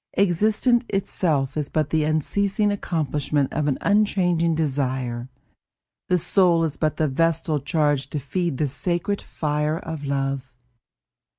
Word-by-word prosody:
Existence 215 +6 +2
itself 155 -8 0
is 150 -2 -2
but 155 -2 -1
the 160 -1 +2
unceasing 200 +7 +1
accomplishment 150 -7 -1
of 150 -1 0
an 140 - +1
unchanging 180 -5 +2
desire; 130 -5 -2 0.8
the 180 - +4
soul 175 -1 +4
is 160 -3 -1
but 155 -2 -1
the 155 - +2
vestal 160 +1 +1
charged 145 -1 0
to - - -2
feed 155 +2 -2
the 150 - +1
sacred 175 +8 -2
fire 150 0 -1
of 160 -3 -6
love. 135 -2 -2
155 Hz, 130 wpm, -23 LUFS, 140-175 Hz, 0.8 s, the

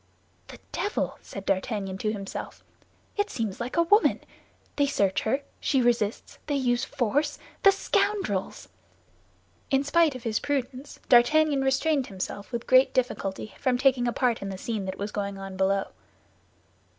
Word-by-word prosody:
"The - - -11
devil!" 410 - -2
said 195 -1 -9
D'Artagnan 195 -1 -1
to 215 - 0
himself. 195 -2 -6 0.5
"It 410 0 +1
seems 220 -5 -3
like 245 +6 -4
a 335 - +5
woman! 415 +6 +4 0.6
They 285 -1 +2
search 200 -8 +1
her; 270 +6 0 0.2
she 270 - +1
resists; 235 -3 0
they 290 - 0
use 245 -3 +1
force—the 290 - +1
scoundrels!" 390 - -1 1.0
In 270 0 +2
spite 310 0 +3
of 255 - -8
his 220 -2 0
prudence, 275 0 -3
D'Artagnan 285 +4 +5
restrained 270 +1 +1
himself 200 +2 -6
with 235 -1 -4
great 255 +1 +5
difficulty 215 -5 -2
from 255 -2 +1
taking 255 -2 +3
a - - +1
part 240 0 0
in 195 - -4
the 190 - -5
scene 215 0 -3
that 190 0 -5
was 205 +1 -4
going 200 -1 -3
on 195 -1 -7
below. 195 +1 +1
245 Hz, 150 wpm, -27 LUFS, 200-280 Hz, 1.0 s, a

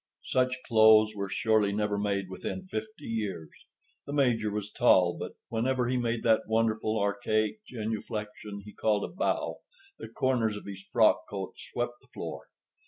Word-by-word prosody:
Such 130 0 +2
clothes 110 -1 +6
were 100 -1 -3
surely 110 0 +2
never 105 0 0
made 100 -1 -1
within 95 - -5
fifty 185 -3 -6
years. 100 -9 -3 0.6
The 140 - -4
Major 120 -7 +2
was 105 0 -4
tall, 90 -8 +4
but - - -6 0.2
whenever 125 +2 0
he 130 - +1
made 120 -1 -1
that 110 -1 +3
wonderful, 110 0 +1
archaic 110 - 0
genuflexion 105 -2 -5
he 105 - -11
called 105 -2 +1
a - - -5
bow, 185 - -1 0.4
the - - -7
corners 120 -5 +1
of - - -10
his 100 -1 -7
frock - - +4
coat - - -5
swept 120 0 -4
the - - -25
floor. - - -7
110 Hz, 160 wpm, -29 LUFS, 105-120 Hz, 0.6 s, clothes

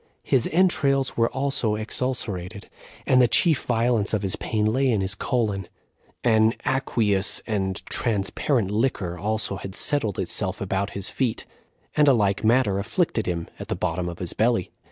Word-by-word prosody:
His 130 -3 +2
entrails 140 -7 +2
were 115 0 +2
also 135 -5 0
ex 110 +1 -3
ulcerated, 100 -6 -3 0.4
and 130 -1 +5
the 125 - +5
chief 160 +3 +3
violence 115 -3 +1
of 105 - -2
his 95 - 0
pain 105 -1 -1
lay 130 +4 +2
on 100 - 0
his 95 0 -1
colon; 105 -4 -1 0.6
an 110 -1 +4
aqueous 105 -7 +1
and 95 -3 -2
transparent 110 0 0
liquor 105 -6 0
also 105 0 -1
had 95 -1 -7
settled 115 -10 -1
itself - - -2
about 100 +1 -1
his 95 - -3
feet, 125 -5 -1 0.5
and 150 -1 +4
a 140 - +7
like 100 -4 +1
matter 110 -4 +3
afflicted 115 - -1
him 85 -2 -2
at - - -7
the - - -2
bottom 90 0 -2
of 85 - -7
his 90 -2 -3
belly. 115 -3 +1
110 Hz, 165 wpm, -24 LUFS, 100-125 Hz, 0.6 s, a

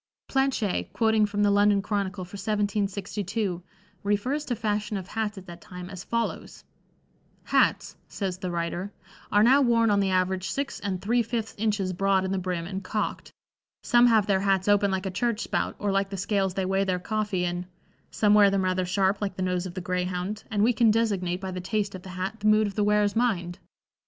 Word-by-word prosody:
Planché, 270 -7 0
quoting 220 -2 +3
from 205 0 -1
the 205 - +4
London 205 0 +4
Chronicle 200 -2 -2
for 180 - -19
1762, 200 -1 -2 0.4
refers 210 +9 0
to 245 - -2
fashion 210 -2 -2
of 185 -1 -7
hats 215 -2 -2
at 190 - -9
that 175 -2 -11
time 180 +1 -9
as 185 -2 -7
follows: 230 0 -3 0.8
"Hats," - - +1
says 185 -3 -4
the 185 - -3
writer, 175 +3 -3 0.4
"are 205 +1 +5
now 265 +5 +6
worn 230 -3 +3
on 200 - +3
the 195 -1 +1
average 185 0 0
six 280 0 -3
and 195 -3 -3
three 235 +4 +2
fifths 225 -1 -3
inches 205 -3 -1
broad 195 +1 +2
in 190 - -2
the 195 - 0
brim 180 -2 -3
and 190 +2 -5
cocked. 210 +3 -3 0.5
Some 240 0 +5
have 220 -3 +4
their 195 -2 +2
hats 195 -1 +1
open 205 -1 +4
like 190 0 -2
a 190 - -2
church 230 +3 -1
spout - - -2
or 205 -1 -1
like 195 0 +1
the 195 - -5
scales 195 -1 0
they 190 - -1
weigh 195 +1 +1
their 185 -2 0
coffee 205 -1 -1
in; 175 +1 -3 0.4
some 210 -1 +2
wear 205 -1 +7
them 195 -1 +1
rather 185 0 0
sharp 195 +2 +1
like 195 -2 -2
the 185 - -3
nose 180 0 -1
of 175 - -10
the 185 - -4
greyhound, 180 +3 -3
and 205 -1 +1
we 240 +3 +4
can 225 0 +4
designate 200 -5 +1
by 190 -1 -4
the 185 0 -5
taste 205 +2 -2
of 185 - -7
the 185 - -11
hat 195 +4 -3
the 210 - 0
mood 215 0 +5
of 205 - -3
the 210 - 0
wearer's 210 -1 +2
mind. 185 -8 0
200 Hz, 210 wpm, -26 LUFS, 185-215 Hz, 0.8 s, wear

